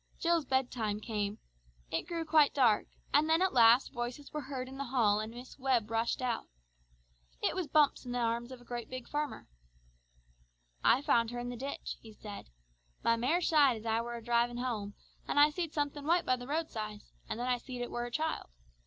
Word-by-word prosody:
Jill's 335 -2 +2
bed 260 -1 +1
time 215 -4 -2
came. 210 -2 -2 0.5
It 165 - -1
grew 335 -2 -3
quite 305 -2 +4
dark, 240 -6 +4 0.3
and 300 +2 +4
then 320 +1 +5
at 375 0 +2
last 235 +2 +6
voices 245 +3 -5
were 300 - -2
heard 265 -2 -5
in 265 +1 -9
the 275 - -2
hall 230 -5 +3
and 215 +1 -4
Miss 245 +4 -11
Webb 250 -5 +1
rushed 230 +2 0
out. 240 -2 -1 0.9
It - - +1
was 365 -4 -2
Bumps 300 -2 +3
in 250 - -6
the 245 - -1
arms 235 +1 -1
of 255 - -8
a 240 -1 -6
big 255 -1 -7
farmer. 295 -1 -3 1.4
"I 265 - +5
found 230 -5 +3
her 240 - -5
in 245 0 -3
a - - -5
ditch," 275 +4 -5
he 220 -1 -12
said; 210 - -9 0.5
"my 230 - +4
mare 265 +10 +1
shied 290 -8 +4
as 220 - -11
I 225 0 +1
were 240 0 -5
a 235 - -7
drivin' 240 +1 +1
home, 220 -5 -3 0.3
and - - +2
I 295 +1 +7
seed 335 -1 -3
somethin' 290 -1 -2
white 345 +1 +3
by 255 - +3
the 245 0 -9
roadside, 220 -9 -3 0.3
and - - -3
then 245 - -1
I 250 -1 +1
seed 250 0 -6
it 245 - -6
were 240 0 -2
a - - -5
child. 315 +5 -2
245 Hz, 210 wpm, -32 LUFS, 230-290 Hz, 1.4 s, I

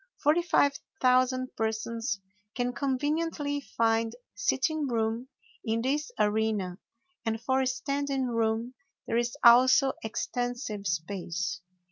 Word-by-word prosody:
Forty 310 +4 +3
five 285 -4 +3 0.3
thousand 255 0 +2
persons 225 0 -2 0.4
can 245 -1 -1
conveniently 290 +2 -1 0.2
find 225 0 +2 0.2
sitting 275 +8 0
room 230 0 -1 0.4
in 225 0 0
this 295 +4 -1
arena, 210 -3 0 0.4
and 225 -1 -1
for 260 +3 +1
standing 275 +1 -1
room 230 0 0 0.3
there 230 - 0
is 240 0 -1
also 255 +3 +7
extensive 235 -2 -3
space. 175 +1 -3
240 Hz, 105 wpm, -29 LUFS, 220-265 Hz, 0.4 s, also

